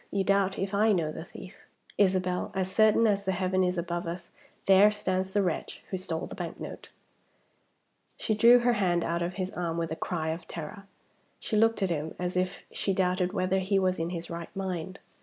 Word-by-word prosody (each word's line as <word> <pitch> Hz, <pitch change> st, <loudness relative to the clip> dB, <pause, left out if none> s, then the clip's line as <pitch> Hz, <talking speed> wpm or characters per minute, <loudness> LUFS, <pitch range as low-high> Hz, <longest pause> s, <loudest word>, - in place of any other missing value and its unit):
You 195 Hz, -1 st, 0 dB
doubt 195 Hz, 0 st, +2 dB
if 195 Hz, +1 st, -2 dB
I 215 Hz, +2 st, +4 dB
know 165 Hz, -5 st, 0 dB
the 160 Hz, -, -7 dB
thief. 190 Hz, +1 st, -11 dB, 0.4 s
Isabel! 185 Hz, -2 st, +1 dB
as 190 Hz, -1 st, -1 dB
certainly 215 Hz, +1 st, +5 dB
as 200 Hz, 0 st, -1 dB
the 190 Hz, -, +1 dB
heaven 185 Hz, 0 st, +1 dB
is 180 Hz, 0 st, 0 dB
above 170 Hz, 0 st, -3 dB
us, 170 Hz, +1 st, -6 dB, 0.3 s
there 195 Hz, +2 st, +7 dB
stands 190 Hz, -2 st, -1 dB
the 205 Hz, 0 st, +2 dB
wretch 175 Hz, -4 st, -3 dB
who 190 Hz, -, -1 dB
stole 175 Hz, -3 st, -3 dB
the -, -, -9 dB
bank -, -, -6 dB
note!" -, -, -8 dB, 1.3 s
She 220 Hz, -, -1 dB
drew 235 Hz, +3 st, +7 dB
her 240 Hz, 0 st, +3 dB
hand 180 Hz, -5 st, +1 dB
out 170 Hz, +1 st, -1 dB
of 175 Hz, +1 st, -2 dB
his 185 Hz, -1 st, -3 dB
arm 170 Hz, -2 st, -2 dB
with 165 Hz, -1 st, -2 dB
a -, -, -1 dB
cry 160 Hz, -2 st, -2 dB
of 165 Hz, +1 st, -5 dB
terror. 175 Hz, +5 st, -7 dB, 0.5 s
She -, -, -3 dB
looked 225 Hz, -1 st, +3 dB
at 185 Hz, -, +1 dB
him 155 Hz, -1 st, -3 dB
as 180 Hz, 0 st, -3 dB
if 185 Hz, +1 st, -1 dB
she 195 Hz, -, -1 dB
doubted 185 Hz, -1 st, +1 dB
whether 185 Hz, -1 st, +1 dB
he 195 Hz, +1 st, +1 dB
was 185 Hz, -2 st, +1 dB
in 165 Hz, +1 st, -1 dB
his 170 Hz, -1 st, -5 dB
right 170 Hz, 0 st, -5 dB
mind. 190 Hz, -1 st, -4 dB
185 Hz, 210 wpm, -28 LUFS, 175-195 Hz, 1.3 s, there